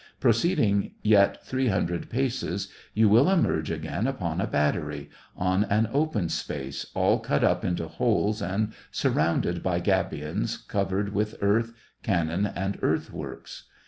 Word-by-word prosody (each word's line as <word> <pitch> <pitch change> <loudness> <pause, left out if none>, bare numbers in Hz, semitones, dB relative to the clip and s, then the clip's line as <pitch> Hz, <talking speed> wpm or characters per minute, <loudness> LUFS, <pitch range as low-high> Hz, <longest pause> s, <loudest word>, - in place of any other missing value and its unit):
Proceeding 115 - +2
yet 105 -2 +4
three 130 0 0
hun 95 -5 +2
dred 85 0 -4
paces, 130 0 -2 0.3
you 110 0 +5
will 115 - +5
emerge 125 - +2
again 80 +8 -2
upon 90 -10 -2
a - - 0
battery, 75 0 -1 0.2
— - - -35 0.2
on 95 +2 +3
an 105 +2 +2
open 140 - +1
space, 70 -3 -4
all - - +3
cut - - 0
up - - +2
into 85 -2 -1
holes 105 +6 0
and 105 +3 -1 0.2
sur - - 0
rounded 85 +2 +1
by 90 -2 0
gabions, 80 -8 -1
covered 100 0 -1
with 105 +1 -1
earth, 115 +3 +1 0.3
cannon, 90 0 0
and 95 +1 -3
earthworks. - - -3
100 Hz, 145 wpm, -26 LUFS, 85-110 Hz, 0.3 s, you